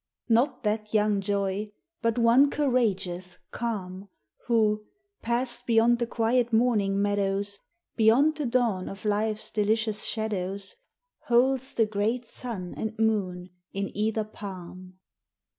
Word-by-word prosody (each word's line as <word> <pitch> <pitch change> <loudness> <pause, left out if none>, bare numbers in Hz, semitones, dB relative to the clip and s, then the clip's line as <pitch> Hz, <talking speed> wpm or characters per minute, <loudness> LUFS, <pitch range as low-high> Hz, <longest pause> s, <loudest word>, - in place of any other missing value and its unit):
Not 235 +5 +2
that 215 0 -1
young 210 -1 +3
Joy, 200 +1 -2 0.3
but 230 -1 +1
one 240 +4 +5
courageous, 195 -11 0
calm, 200 -4 -4 0.4
Who 215 -3 +2 0.4
passed 240 +1 -2
beyond 235 +1 +4
the 235 - 0
quiet 235 +1 +1
morning 220 -4 +2
meadows 200 0 0 0.4
Beyond 250 +8 +5
the 295 -4 -1
dawn 235 -6 0
of 195 +1 -9
life's 215 +1 0
delicious 215 0 0
shadows 200 -3 -2 0.5
Holds 260 +2 +2
the 225 - +4
great 215 +4 -1
sun 220 -7 -6
and 220 0 -4
moon 190 -5 0 0.2
in 195 0 -3
either 215 +1 0
palm. 185 -3 -9
215 Hz, 120 wpm, -27 LUFS, 200-235 Hz, 0.5 s, one